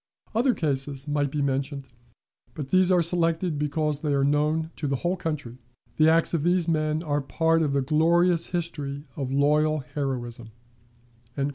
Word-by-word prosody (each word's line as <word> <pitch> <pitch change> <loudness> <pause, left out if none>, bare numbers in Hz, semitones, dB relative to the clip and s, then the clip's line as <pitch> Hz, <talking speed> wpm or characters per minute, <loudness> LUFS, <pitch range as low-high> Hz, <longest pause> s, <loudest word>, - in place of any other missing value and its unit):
Other 245 +3 +2
cases 140 -2 -1
might 145 -1 0
be 145 +1 -2
mentioned, 140 0 -2 0.7
but 145 -4 -6
these 185 +2 +4
are 180 -2 +4
selected 165 -1 0
because 150 0 -1
they 150 -1 -1
are 140 -1 +2
known 150 +3 +1
to 150 - -3
the 135 - 0
whole 175 +7 -1
country; 150 -8 -5 0.4
the 155 0 +5
acts 165 +1 +3
of 165 - +1
these 175 +1 +1
men 155 -1 0
are 145 -2 -1
part 165 +4 +1
of 145 -3 0
the 140 -1 +1
glorious 170 +4 +3
history 145 -5 -4
of 135 -4 -4
loyal 150 +2 +2
heroism." 120 -5 -4
150 Hz, 160 wpm, -25 LUFS, 140-165 Hz, 0.7 s, the